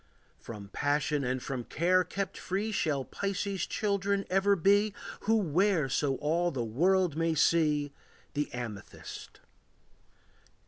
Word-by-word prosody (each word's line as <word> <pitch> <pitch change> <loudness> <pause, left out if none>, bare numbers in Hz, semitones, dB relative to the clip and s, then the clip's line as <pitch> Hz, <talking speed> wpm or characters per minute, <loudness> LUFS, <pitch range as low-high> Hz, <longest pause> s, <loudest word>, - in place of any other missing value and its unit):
From 105 -3 -9
passion 145 +3 0
and 130 0 -2
from 130 -3 -3
care 180 +8 +2
kept 190 +2 -4
free 200 +4 -2
Shall 145 -9 0
Pisces' 200 -1 -2
children 200 -1 0
ever 195 +2 +4
be 200 +3 +3 0.3
Who 225 +2 +4
wear 180 -5 +2
so 135 0 +1
all 165 +5 +1
the 125 -7 -3
world 175 - +2
may 165 0 +1
see 150 -2 +2 0.4
The 145 0 -2
amethyst. 115 -5 -8
165 Hz, 125 wpm, -30 LUFS, 140-195 Hz, 0.4 s, ever